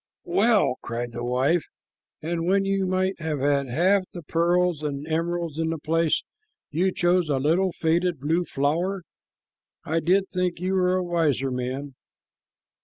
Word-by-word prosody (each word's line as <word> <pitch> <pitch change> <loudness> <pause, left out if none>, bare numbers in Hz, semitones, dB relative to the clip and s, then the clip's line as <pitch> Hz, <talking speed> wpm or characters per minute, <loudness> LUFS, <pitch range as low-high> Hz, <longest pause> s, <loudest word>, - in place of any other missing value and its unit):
'" - - -68
"Well!" 200 - +2
cried 120 0 -4
the 120 +1 -6
wife, 130 +7 +1 0.6
"and 165 +1 -2
when 195 +1 +3
you 195 -1 0
might 185 0 0
have 155 -3 -2
had 140 -1 +1
half 185 +10 +3
the 175 - -7
pearls 170 +1 +1
and 145 -1 -4
emeralds 165 -1 -2
in 165 0 0
the 165 - -2
place, 160 +1 +1 0.5
you 180 +5 +1
chose 175 -2 +1
a 140 - +2
little 170 +7 +2
faded 170 0 0
blue 160 +6 +1
flower! 170 +6 -1 0.8
I 165 +2 0
did 190 +4 +2
think 180 -2 -2
you 185 +2 -1
were 185 -1 +2
a 185 - 0
wiser 155 -7 0
man." 130 +3 -4
165 Hz, 160 wpm, -25 LUFS, 145-180 Hz, 0.8 s, when